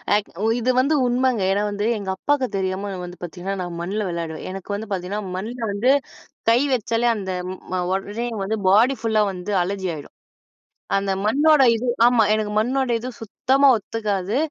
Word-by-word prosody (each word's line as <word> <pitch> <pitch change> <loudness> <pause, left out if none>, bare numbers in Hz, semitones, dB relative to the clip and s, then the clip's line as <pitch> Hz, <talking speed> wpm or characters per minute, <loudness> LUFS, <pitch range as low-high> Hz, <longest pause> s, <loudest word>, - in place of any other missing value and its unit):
ஆக் 210 - -1 0.2
ஒ - - +3
இது 255 +2 +1
வந்து 300 +3 +2
உண்மங்க. 245 -4 +1
ஏன்னா, 205 - 0
வந்து 205 +2 -1
எங்க 195 -2 -3
அப்பாக்கு 285 +2 0
தெரியாம 190 +1 -2
நான் 180 -1 -5
வந்து 180 0 -11
பாத்தீங்கன்னா, 180 +3 -5
நான் 175 -1 -6
மண்ல 200 +1 -2
விளையாடுவேன். 165 -2 -5
எனக்கு 195 +1 -5
வந்து 220 0 -8
பாத்தீங்கன்னா, 190 +3 -3
மண்ல 225 +6 -5 0.2
வந்து 230 +6 +3 0.6
கை 235 +2 +4
வச்சாலே, 235 +1 0
அந்த 190 -2 -4 0.4
ம - - +1 0.2
உடனே 205 +5 -3 0.2
வந்து 220 +3 -1
பாடி 230 +8 +5
ஃபுல்லா 220 -2 +2
வந்து 185 +3 -5
அலர்ஜி 190 0 -3
ஆயிடும். 145 - -10 0.9
அந்த 195 0 0
மண்ணோட 290 +6 +4
இது 230 +2 -3 0.2
ஆமா. 240 -1 +5
எனக்கு 215 -1 -1
மண்ணோட 255 +3 +1
இது 245 +3 -6
சுத்தமா 265 +5 +1
ஒத்துக்காது. 210 -1 -2
210 Hz, 170 wpm, -22 LUFS, 190-240 Hz, 0.9 s, பாடி